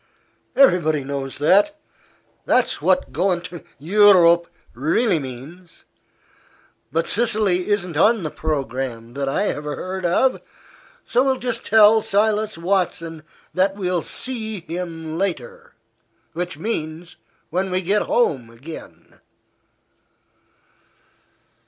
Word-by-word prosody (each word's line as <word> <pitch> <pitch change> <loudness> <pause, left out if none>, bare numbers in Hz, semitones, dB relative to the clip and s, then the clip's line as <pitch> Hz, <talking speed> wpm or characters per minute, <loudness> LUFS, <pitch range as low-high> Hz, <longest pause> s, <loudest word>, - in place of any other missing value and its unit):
Everybody 165 - +4
knows 135 -1 -5
that. 205 - +3 0.7
That's 250 -10 +1
what 185 0 +1
goin' 175 +5 0
to 175 -1 -9
Eu 205 +8 +5
rope 170 -1 +5 0.3
really 165 - +1
means. 145 +7 -10 1.1
But 165 +1 0
Sicily 210 -5 +1
isn't 190 -5 -1
on 215 +6 +3
the 155 - -3
programme, 130 -6 -4
that 140 0 -2
I 200 - 0
ever 150 0 -4
heard 185 0 -5
of. 215 +10 +2 0.6
So 250 - +2
we'll 265 -1 +1
just 245 -1 -3
tell 220 0 +6
Silas 215 -1 0
Watson 170 -3 -1 0.3
that 190 +1 +1
we'll 180 -3 -1
see 220 -1 -5
him 165 -1 -5
later 475 - -4 0.6
which 175 -2 -4
means 165 -3 -5 0.3
when 185 +3 -1
we 185 +1 -1
get 205 +4 +2
home 135 - 0
again." 130 +8 -12
180 Hz, 110 wpm, -21 LUFS, 155-210 Hz, 1.1 s, tell